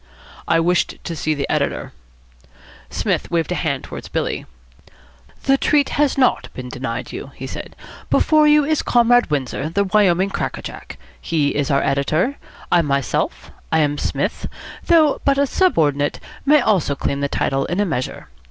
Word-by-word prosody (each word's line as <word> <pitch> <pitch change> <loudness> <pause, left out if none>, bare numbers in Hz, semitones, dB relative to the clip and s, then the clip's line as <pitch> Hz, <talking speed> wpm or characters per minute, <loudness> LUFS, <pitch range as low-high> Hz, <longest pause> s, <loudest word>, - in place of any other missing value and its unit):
"I 165 - +3
wished 175 +2 +1
to 170 - -4
see 155 0 -1
the 140 -1 -2
editor." - - -1 1.0
Psmith - - -1
waved 170 0 -1
a - - +2
hand 145 -7 -2
towards - - -8
Billy. - - -2 1.0
"The 270 0 +3
treat 290 -2 +2
has 290 -2 +1
not 255 -2 +2
been 125 -1 -6
denied 125 -1 -5
you," - - -7
he 130 - -7
said. - - -7 0.3
"Before 310 -1 +4
you 300 -1 +5
is 310 0 +1
Comrade 245 -2 +3
Windsor, 140 0 -2
the 200 +5 +1
Wyoming 195 -2 +2
cracker - - -3
jack. - - -9 0.2
He 150 -4 +1
is 145 -1 -1
our 140 -1 +2
editor. 155 - 0 0.3
I 175 - +5
myself 140 -5 -1 0.2
I 160 - +3
am 145 -1 0
Psmith - - -2 0.4
though 315 -4 +4
but 275 -1 +2
a 280 - +3
subordinate, 150 - +1 0.3
may 300 0 +6
also 190 -11 +1
claim 140 0 -2
the 140 0 -1
title 135 0 0
in 180 - -2
a 205 - +3
measure. 135 -8 -4
165 Hz, 165 wpm, -20 LUFS, -, 1.0 s, may